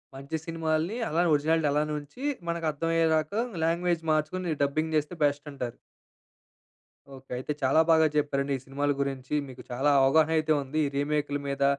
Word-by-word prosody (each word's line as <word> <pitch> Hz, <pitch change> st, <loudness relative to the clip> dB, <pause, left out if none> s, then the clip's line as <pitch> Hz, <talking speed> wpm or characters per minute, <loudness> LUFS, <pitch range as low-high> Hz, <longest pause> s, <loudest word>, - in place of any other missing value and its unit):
మంచి 140 Hz, +4 st, -6 dB
సినిమాల్ని 165 Hz, +3 st, -1 dB
అలా 165 Hz, +3 st, +1 dB
ఒరిజినాలిటి 155 Hz, +1 st, +2 dB
అలానే 150 Hz, +1 st, 0 dB
ఉంచి, 150 Hz, -, -12 dB, 0.3 s
మనకు 170 Hz, -1 st, -2 dB
అర్థం 160 Hz, +3 st, -3 dB
అయ్యేదాక 160 Hz, 0 st, +2 dB, 0.3 s
లాంగ్‌వేజ్ 170 Hz, 0 st, 0 dB
మార్చుకొని 160 Hz, +3 st, 0 dB
డబ్బింగ్ 155 Hz, +3 st, -1 dB
చేస్తే 150 Hz, +4 st, -2 dB
బెస్ట్ 145 Hz, 0 st, +1 dB
అంటారు. 125 Hz, -4 st, -5 dB, 1.4 s
ఓకే. 135 Hz, 0 st, -16 dB
అయితే 130 Hz, +4 st, -4 dB
చాలా 135 Hz, +5 st, +5 dB
బాగా 160 Hz, -1 st, +5 dB
చెప్పారండి 140 Hz, -1 st, 0 dB
ఈ -, -, -11 dB
సినిమాల 145 Hz, +2 st, -1 dB
గురించి. 135 Hz, -1 st, -3 dB
మీకు 130 Hz, -1 st, -10 dB
చాలా 135 Hz, +4 st, +2 dB
అవగాహన 155 Hz, +4 st, +4 dB
అయితే 155 Hz, 0 st, +2 dB
ఉంది. 140 Hz, +4 st, -3 dB
ఈ -, -, -3 dB
రీమేక్‌లా 145 Hz, 0 st, -1 dB
మీద 140 Hz, 0 st, -1 dB
150 Hz, 160 wpm, -28 LUFS, 140-160 Hz, 1.4 s, చాలా